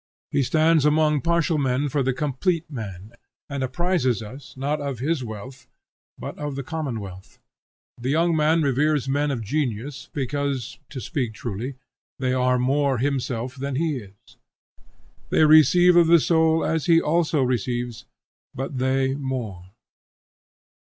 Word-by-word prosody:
He - - +2
stands 155 +3 +3
among 150 -1 +3
partial 170 -1 +1
men 135 +1 +1
for 140 +1 0
the 130 0 +1
complete 150 +6 -1
man, 105 -5 -7 0.4
and 140 -1 -4
apprises 130 - 0
us 130 +5 -11
not 145 +3 -1
of 140 -3 -3
his 140 +3 -1
wealth, 125 +3 -9 0.5
but - - -7
of 145 -2 -4
the 140 - -4
common 145 -6 -3
wealth. 95 -2 -10 0.6
The 125 +2 -3
young 165 +3 +2
man 160 +1 +3
reveres 145 +1 +1
men 145 +2 +1
of 125 -5 -2
genius, 135 +1 -3
because, 140 -2 -3
to 135 - -6
speak 125 - -3
truly, 120 +5 -5 0.4
they 130 -1 0
are 125 0 +2
more 135 +1 +1
himself 125 -2 -2
than 140 0 -4
he 155 0 0
is. 100 -4 -14 0.9
They 155 - +4
receive 175 +4 +6
of 170 -1 +6
the 170 0 +7
soul 160 0 +2
as 160 -1 -1
he 165 -1 +6
also 155 -3 +1
receives, 120 -1 -2 0.5
but 135 0 -4
they 130 +1 +1
more. 120 -10 -5
135 Hz, 145 wpm, -24 LUFS, 125-155 Hz, 0.9 s, the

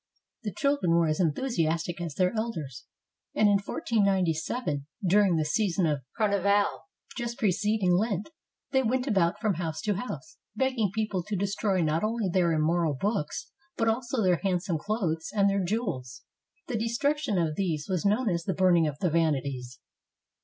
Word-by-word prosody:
The 215 -3 -4
children 280 - +1
were 170 0 +4
as 155 -1 0
enthusi 170 - +1
astic 170 +1 -2
as 160 -4 -5
their 185 +2 +2
elders, 160 - -4 0.5
and 215 - +4
in 200 -1 +4
1497, 185 - 0 0.2
during 195 0 +4
the 155 -1 +1
season 185 +2 +1
of 150 -3 0 0.2
Car 215 - +3
nival 200 +1 +2 0.4
just 235 -1 -4
preceding 210 -3 +1
Lent, 205 - 0 0.4
they 265 -1 +3
went 255 +1 0
about 190 -9 +1
from 215 -3 +1
house 160 -2 -3
to 210 - 0
house, 250 - -6 0.2
begging 260 -6 +1
people 210 -3 -1
to 205 +4 -4
destroy 200 0 0
not 155 +3 0
only 220 -1 0
their 175 -1 +2
immoral 160 0 +1
books, 200 -7 -2 0.3
but 225 - +1
also 240 +1 0
their 180 -2 +3
handsome 180 -3 0
clothes 175 -5 -2
and 200 -1 +4
their 200 -1 +1
jewels. 140 - -3 0.4
The 245 -9 -2
destruction 240 +1 0
of 160 -3 0
these 160 -6 -1
was 185 -3 -1
known 215 +5 +2
as 170 -4 0
the 190 - -1
"Burning 175 -4 +4
of 145 -2 -4
the 180 - +1
Vanities." 140 -6 -1
190 Hz, 165 wpm, -28 LUFS, 165-220 Hz, 0.5 s, were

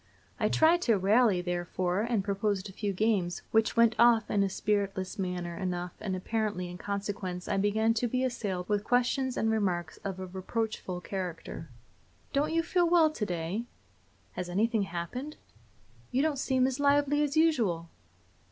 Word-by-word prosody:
I - - +2
tried 330 +2 +4
to 230 -10 +3
rally, 200 0 +3
therefore, 175 +1 -1
and 230 -3 0
proposed 200 0 -1
a 195 - -11
few 205 +1 -2
games, 195 -3 0
which 220 0 +2
went 230 -1 +5
off 235 -1 +5
in 205 - +2
a 195 - +2
spiritless 200 0 -1
manner 180 -2 -3
enough, 180 -1 -3
and 190 -3 -3
apparently 205 -2 -2
in 180 - -9
consequence 200 -3 -4
I 195 - 0
began 215 +3 +2
to 235 +2 0
be 255 +2 0
assailed 205 -8 -2
with 205 -1 0
questions 250 +2 +1
and 220 - +1
remarks 180 -7 -1
of 195 -2 -5
a 190 - -4
reproachful 190 0 -4
character. 180 -3 -5 0.6
"Don't 295 +3 +1
you 330 0 +2
feel 350 0 +2
well 330 -3 +5
to 225 -8 -3
day?" 175 +6 -3 0.7
"Has 180 - -5
anything 220 +4 +1
happened?" 245 - -5 0.7
"You 265 +3 +1
don't 305 -3 0
seem 260 -1 +2
as 265 +1 -1
lively 285 0 +3
as 295 +1 0
usual!" 230 - +2
210 Hz, 165 wpm, -30 LUFS, 185-245 Hz, 0.7 s, went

